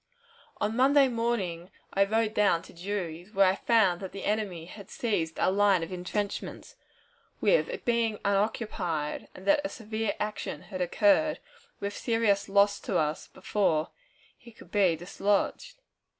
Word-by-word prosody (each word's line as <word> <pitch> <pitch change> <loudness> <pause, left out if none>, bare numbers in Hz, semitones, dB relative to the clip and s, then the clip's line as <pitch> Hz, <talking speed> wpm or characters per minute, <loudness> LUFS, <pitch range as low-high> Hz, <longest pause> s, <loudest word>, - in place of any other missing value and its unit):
On 210 +2 -1
Monday 275 +2 +5
morning 225 -8 -2 0.2
I 195 0 +4
rode 220 +1 0
down 200 -6 +3
to - - -14
Drury's, 180 0 -5
where 195 0 +6
I 185 - +4
found 200 -6 +3
that 190 - -6
the 195 - -7
enemy 200 -6 -2
had 200 +2 -11
seized 170 -9 -2
our - - +3
line 200 -3 +3
of 165 - -6
intrenchments, 200 - -4 0.7
it - - +2
being 230 -3 +1
unoccupied, 195 -6 -1
and 185 - -11
that 295 +4 +4
a 290 - -2
severe 220 -2 -3
action 210 0 -4
had 185 -3 -6
occurred, 300 - +3 0.4
with 200 0 -4
serious 225 -4 +1
loss 200 +1 +4
to - - -1
us 150 0 -1
before 185 -5 0 0.5
he 235 - -16
could 225 - -17
be 190 -5 +3
dislodged. 200 - -1
205 Hz, 150 wpm, -28 LUFS, 185-225 Hz, 0.7 s, where